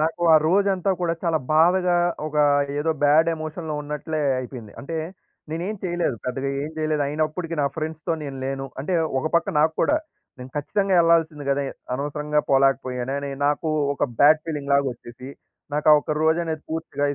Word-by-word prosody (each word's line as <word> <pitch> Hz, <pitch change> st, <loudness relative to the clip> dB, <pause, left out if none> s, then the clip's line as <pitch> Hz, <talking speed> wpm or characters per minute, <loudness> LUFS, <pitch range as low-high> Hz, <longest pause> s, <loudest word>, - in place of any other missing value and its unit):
నాకు 165 Hz, +2 st, -1 dB
ఆ -, -, +8 dB
రోజంతా 195 Hz, 0 st, +2 dB
కూడా 170 Hz, -1 st, 0 dB
చాలా 165 Hz, -3 st, +1 dB, 0.2 s
బాధగా, 180 Hz, +2 st, +4 dB, 0.3 s
ఒక 155 Hz, -, -5 dB, 0.4 s
ఏదో 160 Hz, +2 st, 0 dB
బాడ్ 155 Hz, +3 st, +5 dB
ఎమోషన్‌లో 155 Hz, 0 st, -5 dB
ఉన్నట్లే 150 Hz, +1 st, -4 dB, 0.2 s
అయిపోయింది. 125 Hz, -4 st, -8 dB
అంటే 160 Hz, +4 st, -5 dB, 0.5 s
నేనేం 175 Hz, +7 st, -3 dB
చేయలేదు. 175 Hz, -7 st, -1 dB
పెద్దగా 135 Hz, +2 st, -2 dB
ఏం 150 Hz, -, -4 dB
జేయలేదు. 155 Hz, -1 st, 0 dB
అయినప్పడికీ 155 Hz, +3 st, -2 dB
నా -, -, +2 dB
ఫ్రెండ్స్‌తో 160 Hz, +1 st, -3 dB
నేను 140 Hz, -2 st, -6 dB
లేను. 135 Hz, 0 st, -3 dB
అంటే 165 Hz, +7 st, -2 dB, 0.3 s
ఒక -, -, -7 dB
పక్క 170 Hz, -, +2 dB
నాకు 155 Hz, +1 st, +3 dB
కూడా 300 Hz, +2 st, +3 dB, 0.4 s
నేను 125 Hz, +1 st, -9 dB
ఖచ్చితంగా 195 Hz, +6 st, 0 dB
యెళ్ళాల్సింది 165 Hz, -3 st, +3 dB
గదే! 140 Hz, 0 st, +1 dB, 0.3 s
అనవసరంగా 150 Hz, +2 st, -1 dB
పోలేకపోయానే 135 Hz, -1 st, +1 dB
అని 140 Hz, -, -5 dB, 0.2 s
నాకు 150 Hz, +2 st, 0 dB, 0.3 s
ఒక -, -, -6 dB, 0.2 s
బ్యాడ్ 155 Hz, +2 st, +7 dB
ఫీలింగ్‌లాగా 140 Hz, -2 st, 0 dB
వచ్చేసి, 120 Hz, +2 st, -11 dB, 0.5 s
నాకు 150 Hz, +1 st, +1 dB
ఆ -, -, +10 dB
ఒక్క 150 Hz, -, -3 dB
రోజనేది 160 Hz, -1 st, +1 dB
పూర్తిగా 160 Hz, -3 st, -3 dB
155 Hz, 160 wpm, -23 LUFS, 140-165 Hz, 0.5 s, ఆ